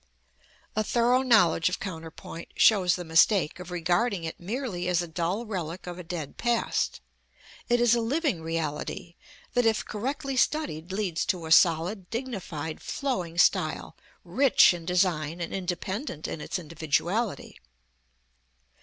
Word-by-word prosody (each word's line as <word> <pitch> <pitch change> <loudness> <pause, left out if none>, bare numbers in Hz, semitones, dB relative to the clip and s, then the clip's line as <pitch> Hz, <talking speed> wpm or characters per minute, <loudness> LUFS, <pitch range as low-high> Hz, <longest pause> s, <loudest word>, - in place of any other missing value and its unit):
A 215 - +1
thorough 240 +3 +3
knowledge 210 -9 +4
of 180 - -3
counterpoint 165 -1 -7
shows 190 -5 +5
the 180 - -5
mistake 165 +2 +3
of 180 - -8
regarding 180 +3 0
it 160 - -5
merely 195 -2 -3
as 180 -1 +2
a - - -6
dull 175 +7 -2
relic 180 -5 -5
of 180 0 -7
a - - -6
dead 165 -4 -6
past. 240 -1 0 0.7
It 240 0 +3
is 240 -1 +4
a 235 - +2
living 265 - 0
reality 165 +1 -4 0.4
that, 245 - +3
if 220 - +1
correctly 270 +5 -3
studied, 220 - 0
leads 190 -4 -1
to 180 -4 -1
a 160 - -6
solid, 175 +4 +4
dignified, 190 - -5
flowing 185 - -3
style, - - +2 0.3
rich 270 -8 +5
in 170 -2 -7
design, 175 -3 0
and 170 - -4
independent 185 - -4
in 155 - -5
its - - -3
individuality. 170 +6 -2
180 Hz, 140 wpm, -27 LUFS, 165-230 Hz, 0.7 s, shows